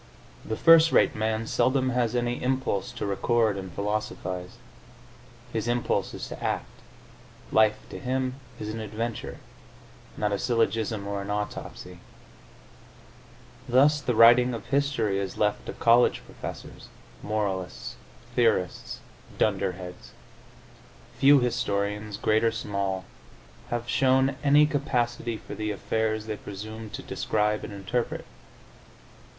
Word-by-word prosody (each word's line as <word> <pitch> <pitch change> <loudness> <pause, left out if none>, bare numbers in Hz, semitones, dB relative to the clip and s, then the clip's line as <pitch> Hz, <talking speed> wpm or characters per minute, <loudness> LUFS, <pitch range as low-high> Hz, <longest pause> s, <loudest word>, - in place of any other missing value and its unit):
The 110 - -4
first 165 0 +7
rate - - +4
man 110 +1 -1
seldom 130 +3 +2
has 120 -1 0
any 120 0 -1
impulse 130 -6 -1
to - - -4
record 110 +2 +1
and 95 -2 -6
philosophise; 100 -1 -3 1.0
his 110 0 -2
impulse 120 0 0
is - - -6
to - - -8
act; - - -1 0.9
life, 110 -1 +4
to - - -6
him, 130 0 -2 0.2
is 105 - -4
an 110 +1 -4
adventure, 110 +1 -4 0.8
not 105 -1 0
a 100 - 0
syllogism 110 -3 0
or 100 0 -3
an 100 - -7
autopsy. 105 0 -5 1.7
Thus 145 +4 +5
the 125 -4 -1
writing 120 +2 +7
of 115 -1 -8
history 130 -7 +1
is 95 -2 -4
left 105 -1 0
to - - -4
college 120 +1 +4
professors, - - -9 0.3
moralists, 100 -4 -3 0.4
theorists, 110 -7 +1 0.4
dunder 100 -3 +1
heads. 90 0 -10 1.1
Few 140 +1 +7
historians, 105 -3 -1
great 110 0 +2
or 115 - +3
small, 100 -4 -3 0.6
have 120 0 -3
shown 130 +1 +3
any 145 +1 +6
capacity 120 -6 -1
for - - -10
the 105 0 -3
affairs 110 +1 -1
they 110 -1 -4
presume 110 +3 -8
to - - -7
describe 105 0 0
and - - -6
interpret. 100 +4 -3
110 Hz, 125 wpm, -27 LUFS, 105-120 Hz, 1.7 s, first